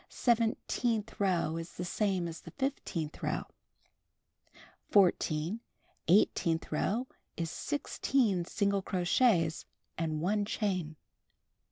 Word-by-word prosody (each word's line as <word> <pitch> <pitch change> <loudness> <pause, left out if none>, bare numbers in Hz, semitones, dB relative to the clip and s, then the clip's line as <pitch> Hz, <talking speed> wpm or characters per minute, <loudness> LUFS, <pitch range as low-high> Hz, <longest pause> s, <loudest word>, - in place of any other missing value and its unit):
Seventeenth 230 -1 0
row 175 -5 +1
is 165 +1 -6
the 180 - -4
same 185 -1 0
as 165 -1 -7
the - - -10
fifteenth 210 - -3
row. - - -1 1.5
14. 180 -1 +3 0.5
Eighteenth 165 -2 +3
row 210 +10 0 0.3
is 165 -1 -2
16 245 - 0
single 200 +1 +1
crochets 180 -2 +2 0.3
and 155 -2 -1
1 205 +5 +1
chain. 185 -7 -1
185 Hz, 95 wpm, -32 LUFS, 165-215 Hz, 1.5 s, 14